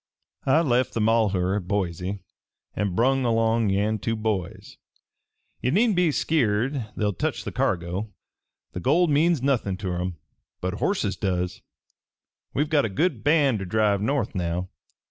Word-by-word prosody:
"I 150 +5 +5
left 130 -5 +1
the - - 0
Malheur 105 -4 +2
at 90 -4 -6
Boise, 95 0 -2 0.5
an' 100 -3 -1
brung 130 +4 +2
along 115 -2 +2
yan 105 +3 +1
two 115 +3 -1
boys. 110 -5 -3 0.8
Ye 125 - +1
needn't 210 - +3
be 180 -1 +3
a - - +2
skeered 130 -4 0
they'll 105 -1 0
touch - - -2
the - - -5
cargo. 90 +4 -1 0.6
The - - -5
gold 155 - +3
means 155 -1 +3
nothin' 120 -9 0
ter 90 -3 -3
'em, 90 -1 -4 0.4
but 90 +1 -2
horses 110 - 0
does. 90 -2 -2 0.9
We've 150 +2 0
got 145 -3 +4
a 115 - -1
good 165 - 0
band 145 -6 +3
ter 95 - -4
drive 105 +1 +1
north 125 0 0
now. 90 -1 -2
110 Hz, 155 wpm, -25 LUFS, 95-135 Hz, 0.9 s, I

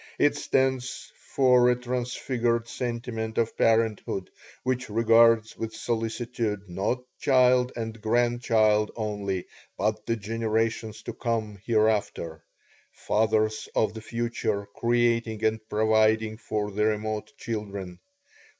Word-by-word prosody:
It 145 - +3
stands 130 -1 -1
for 125 -2 +3
a 125 - +4
transfigured 120 -1 -1
sentiment 115 -2 -4
of 115 -1 0
parenthood 110 -4 +1 0.3
which 130 -1 -1
regards 115 0 +4
with 115 0 -5
solicitude 115 -3 -2
not 100 +8 -2 0.2
child 125 -1 +4
and 115 -1 -5
grandchild 110 -2 +2
only, 105 -4 -3 0.3
but 105 +1 -1
the 115 - +1
generations 110 0 -2
to - - -5
come 110 -4 -2
hereafter 105 -8 0 0.5
fathers 110 0 0
of 110 -1 +2
the 110 - -7
future 115 -3 -2
creating 115 -2 +1
and 110 0 +2
providing 110 0 +2
for 105 -2 -3
the 105 +2 0
remote 110 +1 -2
children. 100 -5 -5
110 Hz, 110 wpm, -27 LUFS, 105-120 Hz, 0.5 s, a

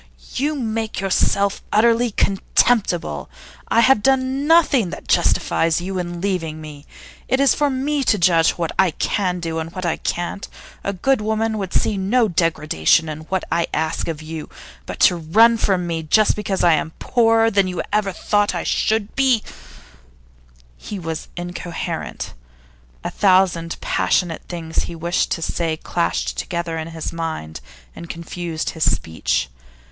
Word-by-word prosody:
you 295 +4 0
make 225 -4 -3
yourself 195 +1 +1
unutterably 235 +2 +3
contemptible. 195 - +1 0.4
I 230 - +3
have 260 -2 +5
done 265 +3 +1
nothing 300 - +4
that - - -9
justifies 165 0 +2
you 185 +1 -4
in 175 -1 -4
leaving 170 -5 -2
me. 150 -2 -10 0.4
It 260 - +1
is 275 -2 +5
for 295 -1 +1
me 275 +2 -1
to 210 - +3
judge 170 -3 +4
what 165 -2 -2
I 190 -1 +5
can 180 +3 -1
do 165 -1 -3
and 160 +1 -5
what 185 -1 -5
I 170 - 0
can't. 175 +3 -3 0.4
A 200 - -1
good 235 +6 +1
woman 220 0 -1
would 190 -2 -4
see 210 - +1
no 220 +5 +2
degradation 160 - +2
in 155 0 -5
what 190 +2 -2
I 170 0 +1
ask 160 +1 -1
of 160 -2 -4
you. 160 0 -7 0.4
But - - -6
to - - +6
run 205 +9 +5
away 230 - -1
from 185 -3 +1
me 165 -1 -2
just 205 +7 +3
because 200 -2 -2
I 170 - +6
am 160 +1 -1
poorer 225 -2 +3
than 200 -2 +3
you 180 -1 -3
ever 210 -2 +1
thought 205 +2 0
I - - -2
should 220 -1 0
be 260 -5 +3 0.7
' - - -30
He 205 - -7
was 165 -3 -5
incoherent. 175 -1 -5 0.7
A - - -3
thousand 185 -4 +2
passionate 170 -3 0
things 165 -2 -6
that - - +3
he 170 - -7
wished 170 +2 0
to 165 - -4
say 160 -1 -1
clashed - - -2
together 170 - -3
in 160 - -5
his 165 -1 -5
mind 160 - -5 0.3
and 170 - -9
confused 170 -1 -4
his 160 - +2
speech. 80 -5 -1
180 Hz, 165 wpm, -20 LUFS, 160-215 Hz, 0.7 s, to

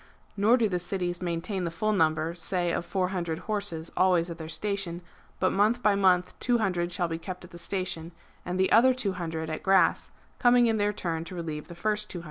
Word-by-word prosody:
(Nor 215 +5 +4
do 230 -3 +2
the 180 -3 -1
cities 175 0 -2
maintain 180 +2 -2
the 170 - -1
full 215 +6 -1
number, 160 -3 +1
say 175 0 -1
of - - -1
400 180 -4 -1
horses, 195 -5 -3
always 180 -2 +3
at 170 - -8
their 160 0 -6
station, 180 -1 -3 0.4
but 185 - +2
month 220 +5 +2
by 210 - +5
month 185 -2 +3
200 195 -8 +1
shall 175 0 -1
be 165 0 -4
kept 180 +2 -7
at 180 - -16
the 170 - -10
station, 170 -2 -3 0.3
and 180 +1 -3
the 190 - +2
other 255 +3 +6
200 175 -9 -3
at 155 0 -4
erass, 195 -1 +4 0.3
coming 245 -1 +5
in 225 -1 +2
their 205 0 +2
turn 165 -5 -3
to 180 - -8
relieve 155 -3 -5
the 170 - -10
first 210 +3 -1
200. 175 - -5
180 Hz, 205 wpm, -28 LUFS, 170-205 Hz, 0.4 s, other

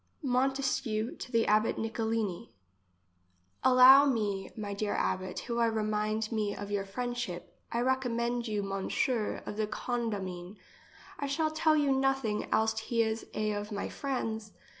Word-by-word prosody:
Montesquieu 255 -3 0
to - - -8
the 230 -2 +3
abbot 215 +1 +2
Nicolini. 220 -4 -2 1.1
Allow 260 +2 +8
me, 205 -7 -1
my 205 -2 -4
dear 205 +1 -2
abbot, 185 0 -1
who 235 -1 -3
I 230 - +4
remind 215 0 -1
me 210 -2 -1
of 205 +1 -6
your 200 -1 -1
friendship. 240 -3 -4 0.2
I 235 - 0
recommend 245 -2 0
you 210 -2 -1
M. 195 -1 -3 0.6
of 205 - -6
the 215 -1 0
Condamine. 205 -5 -4 0.6
I 285 - -2
shall 310 +3 0
tell 315 0 +3
you 290 -2 +2
nothing, 270 -5 0
else 220 +1 +2
he 230 +1 +1
is 220 0 -3
a 215 0 0
of 205 +1 -4
my 200 - -3
friends. 225 -6 -3
220 Hz, 145 wpm, -31 LUFS, 210-250 Hz, 1.1 s, Allow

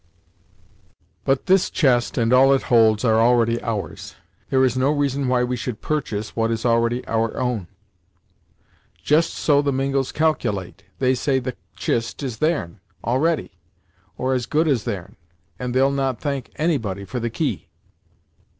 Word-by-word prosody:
"But 135 -1 +1
this 190 -1 +3
chest 125 -6 +1
and 115 0 +2
all 135 +2 +6
it 135 - -2
holds, 110 0 +4
are 110 -1 +4
already 115 0 +3
ours; 105 -9 -5 0.3
there 130 0 +3
is 130 - 0
no 130 +2 +2
reason 140 -2 0
why 125 -1 +2
we 125 0 -1
should 120 -2 -5
purchase 110 -9 -3
what 115 0 +1
is 115 +1 -2
already 115 +1 +1
our 115 0 -1
own." 125 -8 -2 1.4
"Just 155 +3 +3
so 145 -2 +2
the 145 -1 0
Mingos 135 0 -1
caculate! 105 - -1
They 130 -1 +2
say 130 +1 0
the 130 -1 -3 0.2
chist 115 +4 -2
is 120 -5 -4
theirn, 155 - -1 0.2
already; 145 +8 0 0.7
or, 130 +1 0
as 125 -2 -1
good 155 +2 +1
as 130 -7 +1
theirn, 100 -7 -5 0.4
and 125 -1 -3
they'll 135 +2 +3
not 135 -3 -1
thank 140 -4 -3
anybody 115 - -1
for 125 +6 -4
the 120 0 -2
key." 140 +6 -3
125 Hz, 155 wpm, -22 LUFS, 115-140 Hz, 1.4 s, all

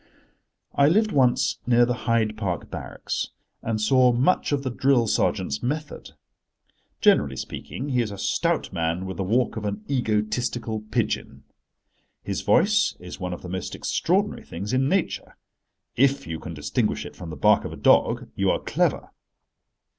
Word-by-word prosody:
I 140 - +4
lived 215 +7 +3
once 125 -3 +2
near 120 0 +5
the 125 - 0 0.2
Hyde 110 -2 +2
Park 95 -5 -3
barracks, - - -4 0.3
and 110 -1 -2
saw 125 +3 +4
much 130 +10 +2
of 140 -1 0
the 130 - -2
drill 130 -1 +3
sergeant's 70 -8 0
method. 150 +4 -4 0.9
Generally 70 -2 +4
speaking, 130 - -6
he 125 -2 +2
is 115 - -2
a 100 - -7
stout - - 0
man 85 +2 -1
with 95 -1 -6
the 95 - -1
walk 115 +4 +1
of 110 - -4
an 100 +1 -3
egotistical 110 -2 -1
pigeon. - - -2 0.8
His - - -3
voice 210 +1 +3
is 90 +1 -9
one 90 -1 -3
of 90 - -7
the 90 - -7
most 95 0 -4
extraordinary 195 +4 0
things 100 +7 -5
in 135 +1 +2
nature: 190 0 -1 0.6
if 140 +2 +2
you 80 -1 -5
can 80 0 -7
distinguish 75 -1 -1
it - - -10
from 90 -3 -8
the 80 - -6
bark - - +4
of - - -5
a - - -8
dog, - - +3
you - - +1
are - - +3
clever. - - -1
115 Hz, 165 wpm, -24 LUFS, 95-135 Hz, 0.9 s, near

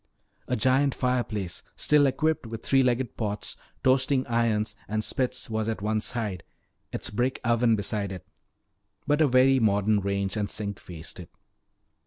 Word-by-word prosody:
A - - 0
giant 130 +4 +2
fireplace 120 -8 -1
still 150 -2 +4
equipped 155 -1 0
with 115 0 -7
three 135 -1 +4
legged 125 -1 0
pots, 105 -2 -3 0.3
toasting 130 0 +3
irons, 115 -3 0
and 110 +1 -1
spits 130 +2 -2
was 110 0 -1
at 110 -2 -3
one 110 0 +1
side, 105 -7 -3 0.5
its - - -5
brick 125 +5 0
oven 120 -1 +3
beside 100 -1 -2
it. 95 -2 -7 0.8
But 150 +1 +2
a 155 - +6
very 130 +1 +5
modern 105 -1 +3
range 100 +1 -1
and 105 -2 -1
sink 100 0 -4
faced 85 0 -8
it. 85 - -9
115 Hz, 155 wpm, -27 LUFS, 105-130 Hz, 0.8 s, a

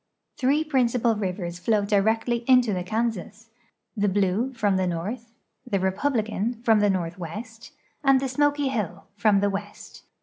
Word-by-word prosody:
Three 290 +2 +2
principal 250 -5 +1
rivers 180 -4 -4
flow 210 +1 +1
directly 220 +4 +1
into 250 -4 +5
the 180 - -2
Kansas; 225 +2 -3 0.4
the 205 -2 +1
Blue, 200 +6 +1
from 210 -6 0
the 185 -1 +1
north; 210 +8 -4 0.4
the 200 -5 0
Republican, 220 +2 -1
from 225 -3 +4
the 205 0 +3
north\vest, 190 - -5 0.3
and 270 -1 +5
the 270 - -2
Smoky 290 +1 +1
Hill, 195 -7 -3
from 205 -1 +3
the 205 - +2
west. 205 +1 -7
220 Hz, 145 wpm, -25 LUFS, 195-245 Hz, 0.4 s, into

